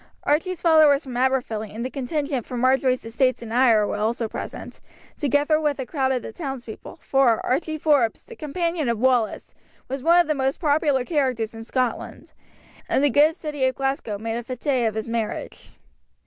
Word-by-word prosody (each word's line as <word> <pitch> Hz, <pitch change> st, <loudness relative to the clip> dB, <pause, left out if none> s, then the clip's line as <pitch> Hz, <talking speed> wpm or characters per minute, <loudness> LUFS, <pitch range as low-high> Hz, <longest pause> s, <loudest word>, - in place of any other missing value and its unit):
Archie's 330 Hz, +4 st, 0 dB
followers 310 Hz, -3 st, +5 dB
from 260 Hz, -, -8 dB
Aberfilly 245 Hz, -4 st, 0 dB
and 225 Hz, +4 st, -6 dB
the 260 Hz, -, -4 dB
contingent 280 Hz, -1 st, -2 dB
from 245 Hz, +2 st, -5 dB
Marjory's 255 Hz, 0 st, +2 dB
estates 255 Hz, +2 st, 0 dB
in 225 Hz, -, -8 dB
Ayr 230 Hz, -3 st, +4 dB
were 205 Hz, -, -3 dB
also 225 Hz, +2 st, -1 dB
present, -, -, -8 dB, 0.3 s
together 290 Hz, +2 st, +1 dB
with 295 Hz, -2 st, 0 dB
a 260 Hz, -, -4 dB
crowd 265 Hz, -1 st, -1 dB
of 255 Hz, -2 st, -1 dB
the -, -, -8 dB
townspeople, 265 Hz, -7 st, -7 dB
for 270 Hz, -4 st, +3 dB
Archie 310 Hz, +4 st, -1 dB
Forbes, 290 Hz, -7 st, +1 dB
the 470 Hz, -, -11 dB
companion 335 Hz, -, -2 dB
of 235 Hz, -, 0 dB
Wallace, 245 Hz, -2 st, 0 dB, 0.3 s
was 270 Hz, +1 st, -4 dB
one 340 Hz, +5 st, +5 dB
of 350 Hz, -, +4 dB
the 305 Hz, -, 0 dB
most 270 Hz, -1 st, -1 dB
popular 290 Hz, -4 st, +1 dB
characters 255 Hz, -8 st, -1 dB
in 225 Hz, 0 st, -8 dB
Scotland, 250 Hz, +1 st, -3 dB, 0.6 s
and 270 Hz, -, +2 dB
the 290 Hz, -, +3 dB
good 300 Hz, +5 st, +4 dB
city 300 Hz, -5 st, -4 dB
of 260 Hz, -, -2 dB
Glasgow 270 Hz, -6 st, -2 dB
made 225 Hz, +2 st, -3 dB
a 240 Hz, -, -5 dB
fete 255 Hz, 0 st, -1 dB
of 215 Hz, -, -3 dB
his 220 Hz, +1 st, -3 dB
marriage. 230 Hz, -1 st, -4 dB
265 Hz, 185 wpm, -23 LUFS, 235-295 Hz, 0.6 s, followers